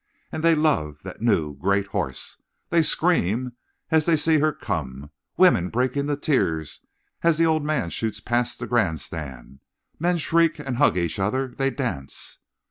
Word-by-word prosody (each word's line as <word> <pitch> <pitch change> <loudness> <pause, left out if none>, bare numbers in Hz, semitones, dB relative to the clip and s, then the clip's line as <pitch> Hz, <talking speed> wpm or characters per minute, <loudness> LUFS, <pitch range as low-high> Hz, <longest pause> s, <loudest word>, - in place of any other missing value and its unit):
And 155 - -4
they 165 -1 +5
love 140 - +1
that 95 +1 -9
new, 80 -11 +1
great 100 +6 +1
horse. - - -3 0.3
They 170 - +5
scream 130 - +1 0.4
as 160 0 +3
they 165 -2 +4
see 155 +1 +3
her 155 +1 +3
come. 75 - -5 0.3
Women 90 +1 +5
break 125 +2 0
into 145 +1 0
tears 80 - -1 0.4
as 170 -2 +3
the 165 - +4
old 160 -2 +2
man 150 - -1
shoots 110 -2 -2
past 120 +2 -1
the - - -5
grand 100 -10 +1
stand. 70 -4 -8 0.4
Men 175 +2 +2
shriek 165 0 +2
and 135 -5 -4
hug 145 -8 +4
each 85 0 -1
other. 130 +7 0
They 135 0 +1
dance. 120 - -5
125 Hz, 165 wpm, -24 LUFS, -, 0.4 s, they